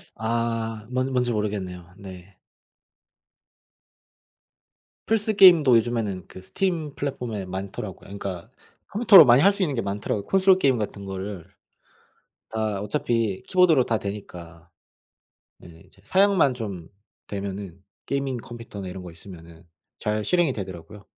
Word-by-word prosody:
아. 115 Hz, -1 st, -2 dB
뭔 130 Hz, +1 st, -1 dB
뭔지 125 Hz, -1 st, 0 dB
모르겠네요. 95 Hz, -4 st, -4 dB
네. 95 Hz, -1 st, -12 dB, 2.7 s
플스 220 Hz, -1 st, +1 dB
게임도 160 Hz, -, +7 dB
요즘에는 105 Hz, -5 st, -2 dB
그 95 Hz, -, -12 dB
스팀 165 Hz, -, -2 dB
플랫폼에 120 Hz, -8 st, -4 dB
많더라고요. 95 Hz, +1 st, -7 dB
그니까 95 Hz, -3 st, -6 dB, 0.4 s
컴퓨터로 205 Hz, -6 st, +7 dB
많이 125 Hz, +2 st, +6 dB
할 200 Hz, +3 st, +6 dB
수 200 Hz, -1 st, -2 dB
있는게 135 Hz, -8 st, -1 dB
많더라고, 100 Hz, 0 st, -3 dB
콘솔 190 Hz, -1 st, +4 dB
게임 130 Hz, -6 st, +3 dB
같은 100 Hz, -2 st, -5 dB
거를. 95 Hz, -2 st, -6 dB, 1.0 s
다 110 Hz, -3 st, -2 dB
어차피 105 Hz, -1 st, -1 dB
키보드로 170 Hz, -8 st, +4 dB
다 110 Hz, -2 st, 0 dB
되니까. 90 Hz, -4 st, -9 dB, 0.9 s
네. 80 Hz, -2 st, -15 dB
이제 -, -, -23 dB
사양만 190 Hz, -, +3 dB
좀 100 Hz, -8 st, -6 dB, 0.4 s
되면은 100 Hz, -2 st, -6 dB, 0.2 s
게이밍 140 Hz, -2 st, -2 dB
컴퓨터나 115 Hz, -5 st, -9 dB
이런 90 Hz, 0 st, -8 dB
거 90 Hz, -, -9 dB
있으면은 85 Hz, -1 st, -13 dB, 0.3 s
잘 105 Hz, 0 st, -2 dB
실행이 175 Hz, -6 st, +2 dB
되더라고요. 95 Hz, 0 st, -8 dB
105 Hz, 290 characters per minute, -24 LUFS, 95-135 Hz, 2.7 s, 게임도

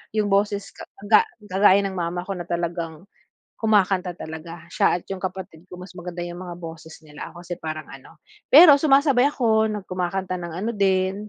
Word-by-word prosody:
yung 210 Hz, -1 st, +1 dB
boses 200 Hz, 0 st, +1 dB
ka -, -, -10 dB, 0.2 s
ga 215 Hz, 0 st, +6 dB, 0.2 s
kagaya 195 Hz, 0 st, +4 dB
ng 195 Hz, -1 st, -4 dB
mama 175 Hz, 0 st, -3 dB
ko 195 Hz, -, -2 dB
na 175 Hz, -, -5 dB
talagang 170 Hz, 0 st, -4 dB, 0.5 s
kumakanta 195 Hz, -5 st, +1 dB
talaga, 160 Hz, +1 st, -9 dB
siya, -, -, +2 dB
at 175 Hz, -, -10 dB
yung 190 Hz, -, -6 dB
kapatid 185 Hz, -2 st, -7 dB
ko, 180 Hz, -, -10 dB
mas 180 Hz, 0 st, -11 dB
maganda 175 Hz, -1 st, -7 dB
yung 175 Hz, 0 st, -8 dB
mga 175 Hz, -2 st, -7 dB
boses 165 Hz, -2 st, -10 dB
nila, 150 Hz, -1 st, -9 dB
ako 175 Hz, 0 st, -13 dB
kasi 175 Hz, 0 st, -7 dB
parang 155 Hz, -1 st, -5 dB
ano, 135 Hz, -1 st, -14 dB, 0.3 s
pero 310 Hz, +2 st, +9 dB
sumasabay 275 Hz, -2 st, +4 dB
ako 220 Hz, -5 st, +1 dB, 0.2 s
kumakanta 185 Hz, 0 st, -3 dB
ng 170 Hz, -1 st, -6 dB
ano 230 Hz, -, -1 dB
din. 195 Hz, 0 st, 0 dB
185 Hz, 180 wpm, -23 LUFS, 170-200 Hz, 0.5 s, pero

